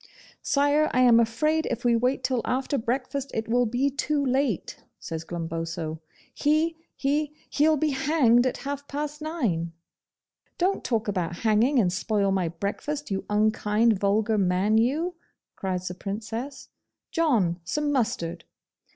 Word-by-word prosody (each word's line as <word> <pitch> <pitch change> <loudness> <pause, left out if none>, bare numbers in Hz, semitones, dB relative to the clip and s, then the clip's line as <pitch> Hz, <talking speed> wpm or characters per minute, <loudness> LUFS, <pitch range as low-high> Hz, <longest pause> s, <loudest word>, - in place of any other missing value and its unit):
'Sire, 290 +2 +2
I 255 - +4
am 240 -2 +7
afraid 305 +8 +1
if 235 - -3
we 240 -1 +4
wait 250 +3 +1
till 255 -3 0
after 265 +3 -1
breakfast 260 +4 -2
it 220 0 -2
will 245 +1 +2
be 255 +5 +1
too 285 +1 0
late,' 260 - -1
says 165 -1 -6
Glumboso. 165 -1 -4 0.3
'He 310 +3 +1 0.2
he 290 +2 -1 0.2
he'll 305 +1 +3
be 305 +1 +1
hanged 265 -3 +3
at 255 - -2
half 285 0 -4
past 295 +1 -4
nine.' 220 - -2 0.8
'Don't 375 +3 0
talk 225 -3 -1
about 180 -4 -1
hanging 225 +6 +3
and 185 -7 +3
spoil 200 0 0
my 190 -3 +1
breakfast, 205 - -4
you 195 - -2
unkind, 215 0 +2
vulgar 210 +2 +2
man 195 +4 +2
you,' 305 +10 +1 0.4
cries 185 -1 -3
the 180 - -3
Princess. 225 +8 -6 0.4
'John, 225 - +2
some 295 - -1
mustard. 215 -11 -1
235 Hz, 140 wpm, -26 LUFS, 200-285 Hz, 0.8 s, am